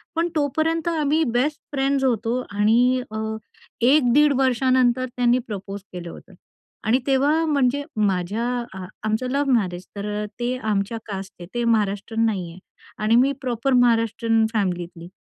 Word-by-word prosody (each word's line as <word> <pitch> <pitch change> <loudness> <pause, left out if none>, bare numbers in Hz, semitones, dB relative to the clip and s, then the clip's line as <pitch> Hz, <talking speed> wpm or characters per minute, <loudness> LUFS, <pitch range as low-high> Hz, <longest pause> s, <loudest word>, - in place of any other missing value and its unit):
पण 335 +1 +1
तोपर्यंत 315 +3 0
आम्ही 310 0 +1
बेस्ट 255 +5 0
फ्रेंड्स 275 0 +1
होतो 240 0 0
आणि 235 +5 +3
अ, 220 - -4 0.6
1 255 0 +4
दीड 295 0 +5
वर्षांनंतर 255 -1 +2
त्यांनी 245 0 +3
प्रपोज 200 -2 -6
केलं 175 -1 -6
होतं 190 - -13 0.5
आणि 235 +4 +3
तेव्हा, 290 +4 +3
म्हणजे 285 -2 +1
माझ्या 200 +1 0 0.4
आ 185 - -6 0.2
आमचं 220 +4 -1
लव्ह 280 -1 +1
मॅरेज, 185 -5 0
तर 200 0 -5 0.2
अ, - - -3
ते 245 +1 -1
आमच्या 215 -1 -1
कास्टचे 195 -3 -7
ते 240 0 -1
महाराष्ट्रीयन 220 0 +1
नाही 190 -6 -1
आहे 180 - -13 0.4
आणि 220 +2 +3
मी 260 +3 +4
प्रॉपर 250 +1 -1
महाराष्ट्रीयन 230 -2 +3
फॅमिलीतली. 175 -4 -2
240 Hz, 145 wpm, -23 LUFS, 205-265 Hz, 0.6 s, दीड